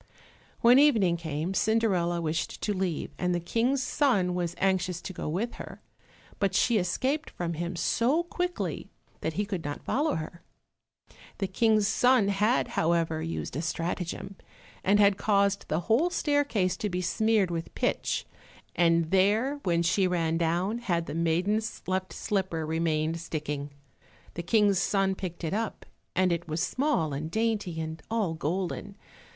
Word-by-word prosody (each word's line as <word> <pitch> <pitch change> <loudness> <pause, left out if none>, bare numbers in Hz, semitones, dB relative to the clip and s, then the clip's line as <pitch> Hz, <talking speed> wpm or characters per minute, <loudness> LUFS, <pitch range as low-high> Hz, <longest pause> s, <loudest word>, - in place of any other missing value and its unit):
When 245 +3 +7
evening 220 -12 +4
came, 160 +1 -3
Cinderella 190 -5 +1
wished 160 +1 -2
to 210 - 0
leave, 185 -4 -2
and 180 -1 +1
the - - 0
King's 245 +9 0
son 205 -14 +2
was 175 -1 -2
anxious 185 -2 +1
to 190 - -7
go 160 - -4
with 205 +9 -2
her, - - -9 0.6
but 195 -2 +1
she 230 +1 +3
escaped 260 - -1
from 170 -1 -4
him 170 +2 -4
so 240 - +1
quickly 355 +1 -3 0.3
that 160 - -2
he 205 +5 -1
could 190 -5 -4
not 145 0 -5
follow 295 +3 +1
her. 160 +2 -6 1.0
The 195 - -1
King's 215 +2 +2
son 245 -3 +4
had, 210 +5 +2
however, 165 -1 +1
used 165 +1 -4
a 150 - -1
strategem, 170 +3 -3 0.5
and 205 +2 +4
had 200 -1 +5
caused 200 -1 +2
the 155 +3 0
whole 235 - +2
staircase 285 - +1
to 210 - -2
be 180 0 -2
smeared 210 +1 +2
with 165 -1 -5
pitch, - - -1 0.5
and 165 -2 +3
there, 215 +9 +2
when 170 -5 +1
she 185 +2 +2
ran 165 -3 0
down, 175 +7 0
had 175 -8 -1
the 145 - -6
maiden's 180 +7 0
left 185 +1 -2
slipper 190 -6 -2
remained 160 0 0
sticking. 150 -3 -4 0.6
The 170 - -4
King's 200 +1 +3
son 195 -1 +1
picked 180 -2 -6
it 165 - -2
up, 220 +1 -3 0.3
and 185 -1 +3
it 170 0 -4
was 160 +2 -1
small 190 - 0
and 150 +3 -4
dainty, 215 -5 -1
and 160 0 -5
all 220 -7 0
golden. 180 +5 -3
185 Hz, 155 wpm, -28 LUFS, 165-215 Hz, 1.0 s, When